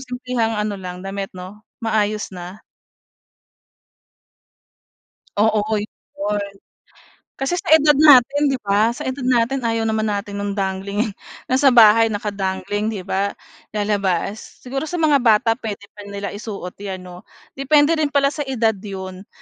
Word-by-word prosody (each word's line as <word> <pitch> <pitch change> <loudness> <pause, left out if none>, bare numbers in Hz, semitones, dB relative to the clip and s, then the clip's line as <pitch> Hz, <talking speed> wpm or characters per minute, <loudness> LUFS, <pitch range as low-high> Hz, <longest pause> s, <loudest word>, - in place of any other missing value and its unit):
simplehang 250 -3 -2
ano 210 -2 -2
lang, 180 0 -7
damit, 195 0 -4
'no, 185 +3 -9 0.2
maayos 215 -2 0
na. 180 +3 -9 2.8
Oo, 215 0 +2
'yon. 205 0 -4 0.9
Kasi 275 +7 -1
sa - - -11
edad 305 -1 +5
natin, 290 -1 +6
'di 275 - +1
ba, 210 +3 +2
sa - - -6
edad 260 0 -3
natin 250 +2 +2
ayaw 230 -2 -1
naman 220 0 0
natin 200 -1 -3
no'ng 200 0 -3
dangling. 200 +2 -2 0.4
Nasa 265 +2 +4
bahay, 225 -3 +7
naka-dangling, 205 -1 -2
'di 210 -4 -4
ba, 200 +1 -1 0.4
lalabas. 205 -1 -2
Siguro 270 +4 -4
sa 355 - -4
mga 310 -4 +3
bata 225 -2 +4
puwede 210 -4 -5
pa 205 -1 -12
nila 200 -1 -5
isuot 200 -4 -7
'yan, 190 -2 -6
'no? 180 0 -12 0.3
Depende 290 +2 +4
rin 305 - +2
pala 280 -1 +2
sa 295 -2 -5
edad 230 -4 +1
'yon, 190 -1 -8
215 Hz, 140 wpm, -20 LUFS, 200-250 Hz, 2.8 s, bahay